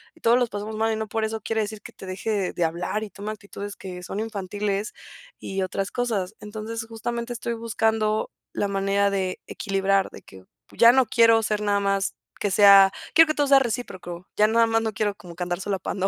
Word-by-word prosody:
y - - -22
todos 235 +2 +4
los 245 -2 +1
pasamos 210 +1 -5
mal 225 0 +1
y - - -1
no 220 0 -3
por 220 0 -1
eso 220 0 -4
quiere 225 +1 -1
decir 210 0 -5
que - - -11
te - - -11
deje 195 +1 -2
de 175 - -1
hablar, 170 +2 -3
y 215 - -6
tome 205 +2 -6
actitudes 205 -1 -8
que 180 -2 -8
son 195 - -5
infantiles, 205 -1 -3 0.5
y 195 0 -4
otras 195 +1 -3
cosas". 220 -5 -2
Entonces 220 +2 -6
justamente 235 +1 -4
estoy 235 0 -3
buscando, 220 -1 0 0.2
la 205 - 0
manera 200 0 +1
de 190 -2 -2
equilibrar, 195 -1 0
de - - -11
que, 95 -1 -15 0.3
ya 235 0 +7
no 260 +1 +4
quiero 230 -1 +5
ser 210 -1 -1
nada 205 -1 +1
más 195 -1 0 0.2
que 205 - -1
sea 195 -1 +8 0.2
quiero 325 0 +8
que 310 - +1
todo 290 -1 +1
sea 275 0 +7
recíproco. 185 -8 -4
Ya 210 - +5
nada 230 +1 +4
más 225 0 +2
no 220 -1 -1
quiero 210 -1 -1
como 175 -3 -12
que 180 - -3
andar 175 +1 -3
solapando 195 -1 -2
210 Hz, 215 wpm, -24 LUFS, 195-225 Hz, 0.5 s, sea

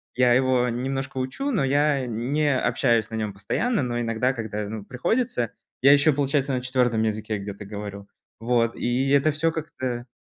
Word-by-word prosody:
я 125 -1 +4
его 130 -1 +3
немножко 130 +2 -3
учу, 130 - -2
но 205 - +1
я 140 0 +2
не 130 +5 0
общаюсь 115 -5 +1
на 110 - -5
нем 110 -2 -2
постоянно, 140 - -1
но 120 -1 -2
иногда, 115 +2 0
когда, 105 -3 -4
ну, 110 -2 -6
приходится, 130 - -1 0.3
я 135 +2 +7
еще, 145 +2 +4
получается, 140 0 0
на 125 - -1
4 125 -3 +1
языке 110 0 -2
где-то 100 +1 -7
говорю. 100 -1 -7 0.3
Вот, 115 0 +1
и 125 +3 0
это 140 +2 +4
всё 165 +2 +1
как-то, 130 -7 -4
125 Hz, 170 wpm, -24 LUFS, 110-140 Hz, 0.3 s, я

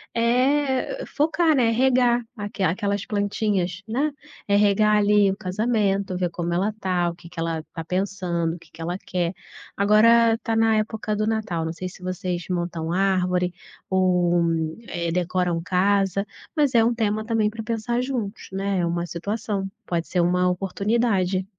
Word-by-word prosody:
eh, 265 - +1
focar, 315 +2 +2
né, 240 -4 +3
regar 245 0 +3 0.2
aque 205 -1 -6
aquelas 200 +3 0
plantinhas, 205 -4 -1
né. 275 +7 0 0.4
É 200 - +3
regar 210 +1 +4
ali 205 -1 +4
o 195 - -4
casamento, 200 -1 0
ver 180 -1 0
como 170 0 -3
ela 195 +5 0
tá, 180 -3 0
o 170 - -7
que 170 0 -14
que 175 -1 -9
ela 165 -1 -2
tá 165 - -5
pensando, 180 -2 -1
o - - -11
que - - -19
que 165 - -12
ela 175 +2 -2
quer. 180 -2 -2 0.4
Agora 225 +3 +5
tá 225 -2 0
na 225 0 +4
época 215 0 -2
do 215 +1 0
Natal, 220 -7 -1
não 160 - -2
sei 185 +2 -5
se 185 - -15
vocês 180 -1 -3
montam 170 -2 -2
árvore 180 -1 +1 0.4
ou, 180 -2 +2 0.4
eh, 170 -1 -2
decoram 180 -1 0
casa, 195 +1 +1 0.3
mas 290 -5 +2
é 230 - +6
um 235 +1 +2
tema 215 -1 -1
também 220 -2 +1
pra 225 +1 -7
pensar 235 +2 -1
juntos, 240 -5 -4
né, 195 0 -1
é 175 - +1
uma 170 0 -1
situação, 200 +3 -3 0.2
pode 170 -1 -2
ser 180 - +1
uma 180 +1 +2
oportunidade. 195 0 0
195 Hz, 165 wpm, -24 LUFS, 180-225 Hz, 0.4 s, é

